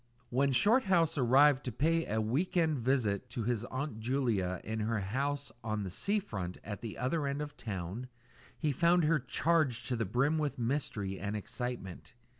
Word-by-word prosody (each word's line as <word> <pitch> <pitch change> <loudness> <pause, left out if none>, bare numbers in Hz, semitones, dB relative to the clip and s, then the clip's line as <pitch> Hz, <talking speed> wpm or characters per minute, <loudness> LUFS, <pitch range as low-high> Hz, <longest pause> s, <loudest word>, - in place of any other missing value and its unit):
When 135 +3 +2
Shorthouse 190 - +3
arrived 135 +2 +5
to 125 - -2
pay 165 +7 +1
a 110 - 0
"week 135 +13 0
end" 160 -5 +2
visit 115 -5 0
to 120 -4 -3
his 115 -1 0
Aunt 130 -2 -4
Julia 110 -7 0
in 110 +1 -3
her 110 +2 0
little 100 -3 -2
house 140 +3 -1
on 110 -2 -2
the 95 - -5
sea 200 - 0
front 95 - -4
at 105 -1 -6
the 115 -2 -6
other 140 +4 0
end 140 +1 -2
of 150 0 -3
the - - -17
town, 100 +3 -4 0.5
he 155 -3 0
found 170 +5 +3
her 155 +1 +3
charged 135 -2 +1
to 125 - +1
the 115 -1 -1
brim 135 +10 +1
with 150 -2 -1
mystery 115 -6 -2
and 100 +2 -3
excitement. 105 -3 -5
125 Hz, 190 wpm, -32 LUFS, 110-150 Hz, 0.5 s, arrived